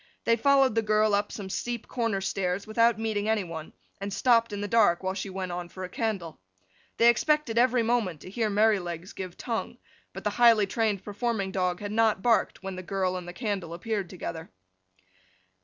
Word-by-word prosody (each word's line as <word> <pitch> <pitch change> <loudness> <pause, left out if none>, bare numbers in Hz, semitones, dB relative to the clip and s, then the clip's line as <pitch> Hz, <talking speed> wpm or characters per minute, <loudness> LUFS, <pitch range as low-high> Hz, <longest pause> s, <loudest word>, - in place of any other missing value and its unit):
They 230 - +3
followed 270 +1 +4
the 225 - +2
girl 215 0 +2
up 205 +1 +1
some 200 -3 -6
steep 240 +1 -3
corner 230 -5 -1
stairs 190 0 -2
without 230 +1 +3
meeting 220 -1 -1
any 220 -2 +2
one, 165 -3 -7 0.3
and 200 +1 -4
stopped 230 0 +3
in 205 - -4
the 205 - -3
dark 205 -5 +3
while 190 0 -1
she 195 +1 -5
went 185 -1 -4
on 175 0 -5
for 185 +2 -8
a 180 - -5
candle. 190 -6 -3 0.6
They 235 - +5
expected 235 0 +3
every 245 -1 +3
moment 220 -9 0
to - - -10
hear 220 0 0
Merrylegs 195 -5 +1
give 185 -2 -7
tongue, 230 -2 -4 0.3
but - - -9
the - - 0
highly 230 -3 +7
trained 210 -1 -1
performing 205 -1 -2
dog 180 -1 -1
had 205 0 -4
not 220 -3 +2
barked 230 -4 +2
when 195 -1 -5
the - - -4
girl 185 0 -1
and 180 -1 -6
the - - -5
candle 195 -7 -3
appeared 200 0 -3
together. 165 -3 -6
205 Hz, 195 wpm, -27 LUFS, 185-230 Hz, 0.6 s, highly